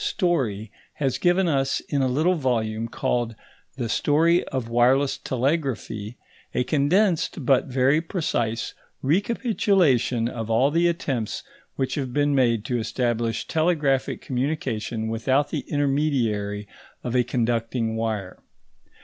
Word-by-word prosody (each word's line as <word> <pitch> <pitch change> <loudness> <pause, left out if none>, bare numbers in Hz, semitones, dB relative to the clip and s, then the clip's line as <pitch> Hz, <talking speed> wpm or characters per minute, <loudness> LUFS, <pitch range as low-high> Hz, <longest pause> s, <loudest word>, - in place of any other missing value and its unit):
Story 135 - 0 0.2
has 135 -4 -1
given 180 +1 +3
us 135 -4 +1
in 140 -2 -2
a 130 - +2
little 155 +8 +2
volume 115 -7 -1
called 115 0 -1 0.4
The 120 -3 -2
Story 160 +9 +3
of 130 -4 -3
Wireless 125 +4 +3
Telegraphy, 125 -5 -2 0.4
a 125 - +2
condensed 160 +1 +1
but 135 0 +4
very 135 +4 +2
precise 120 - -2 0.3
recapitulation 175 - +2
of 115 -2 -5
all 125 +5 +3
the 170 +2 +3
attempts 135 -10 -2 0.3
which 130 -1 -1
have 130 -4 -3
been 145 0 +2
made 120 -5 +2
to 125 -1 -1
establish 115 -1 -1
telegraphic 155 -5 +1
communication 125 -5 -2
without 130 +6 +1
the 150 - -3
intermediary 125 -9 0 0.4
of 120 0 -3
a 125 - +4
conducting 115 -1 -1
wire. 110 -4 -3
130 Hz, 125 wpm, -24 LUFS, 115-150 Hz, 0.4 s, but